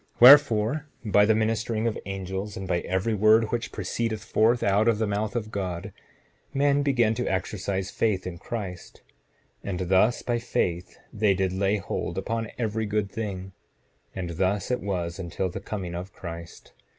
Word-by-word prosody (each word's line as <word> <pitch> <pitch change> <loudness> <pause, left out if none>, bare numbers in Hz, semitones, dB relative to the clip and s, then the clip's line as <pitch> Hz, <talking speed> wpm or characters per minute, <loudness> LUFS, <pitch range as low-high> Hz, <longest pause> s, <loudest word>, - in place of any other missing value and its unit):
7:25 - - -27
Wherefore, 135 +1 +7 0.2
by 105 -1 +5
the 110 +1 +4
ministering 110 0 0
of 115 - 0
angels, 95 +1 -4
and 95 0 -5
by 90 -1 +1
every 95 +6 -1
word 110 +2 +4
which 120 -1 -2
proceeded 110 +2 -2
forth 115 +4 +2
out 100 +3 +3
of 115 -2 +4
the 110 - 0
mouth 105 +2 -2
of 110 -2 -3
God, 95 -1 -4 0.6
men 140 +1 +3
began 120 -6 +2
to 125 +2 -2
exercise 95 0 -2
faith 105 -5 0
in 90 -2 -6
Christ; 95 -5 -7 0.6
and 95 -3 -3
thus 100 +5 +3
by 120 -1 0
faith, 90 -6 -2 0.2
they 105 -3 +2
did 95 0 0
lay 100 +2 +1
hold 95 - -4
upon 115 -1 -2
every 110 -2 -1
good 105 -1 -1
thing; 95 -4 -5 0.6
and 90 -2 -4
thus 95 +4 0
it 125 - 0
was 90 -3 -3
until 90 +1 -2
the 90 - -6
coming 95 -3 -5
of 90 +3 -6
Christ. 85 -1 -9
105 Hz, 170 wpm, -26 LUFS, 95-115 Hz, 0.6 s, Wherefore